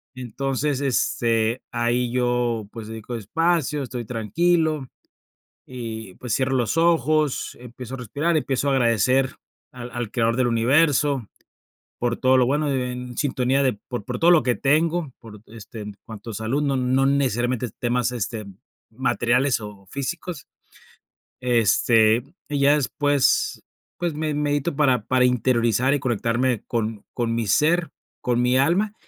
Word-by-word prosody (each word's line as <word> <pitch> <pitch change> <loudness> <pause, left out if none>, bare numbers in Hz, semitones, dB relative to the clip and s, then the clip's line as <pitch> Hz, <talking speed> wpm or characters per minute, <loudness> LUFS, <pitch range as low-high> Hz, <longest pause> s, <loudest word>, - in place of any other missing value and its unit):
Entonces, 135 +3 -2
este, 115 -3 +1
ahí, 120 0 0
yo, 120 -3 0
pues, 110 -2 -8
dedico 110 +2 -6
espacio, 150 - 0
estoy 125 -2 -5
tranquilo, 155 - 0 0.8
y, 110 -6 -7
pues, 125 -3 -3
cierro 130 0 0
los 120 +5 0
ojos, 155 -3 +1
empiezo 125 +1 -9
a - - -4
respirar, 150 - -1
empiezo 140 -1 0
a - - +3
agradecer 130 +1 +2 0.4
al 125 -1 -8
al 120 -2 -4
creador 115 0 +1
del 130 -1 +2
universo 135 +1 +2 0.7
por 120 -1 -1
todo 130 0 +4
lo 125 -1 +4
bueno, 145 +2 +1
e 125 -2 -1
en 125 -1 -7
sintonía 135 -1 +1
de 130 - +3 0.2
por 120 -5 -4
por 125 -1 -4
todo 170 +1 +5
lo 170 -6 +6
que 125 -1 +2
tengo, 155 +1 +1
por, 105 -3 -13
este, 110 0 -10
en 105 -1 -7
cuanto 110 0 -9
a - - -6
salud, 115 +8 -1
no 140 -2 +1
no 130 +1 +2
necesariamente 125 -3 0
temas, 120 0 0
este, 110 -2 -4 0.4
materiales 125 +2 +1
o 105 -2 -10
físicos, 145 +1 -5 0.9
este, 115 -1 +3 0.3
y 145 -1 -1
ya 140 +1 +5
después, 145 -1 +1 0.3
pues, 175 -1 -2
me 155 0 -2
medito 145 +1 -1
para 130 -7 +2
para 130 -1 +2
interiorizar, 125 0 +2
y 145 - +1
conectarme 120 0 0
con 110 -3 -3
con 115 -2 -1
mi 115 -2 -1
ser, 165 - +2 0.3
con 120 -1 0
mi 125 +1 +3
alma. 185 +10 +2
125 Hz, 150 wpm, -23 LUFS, 115-140 Hz, 0.9 s, lo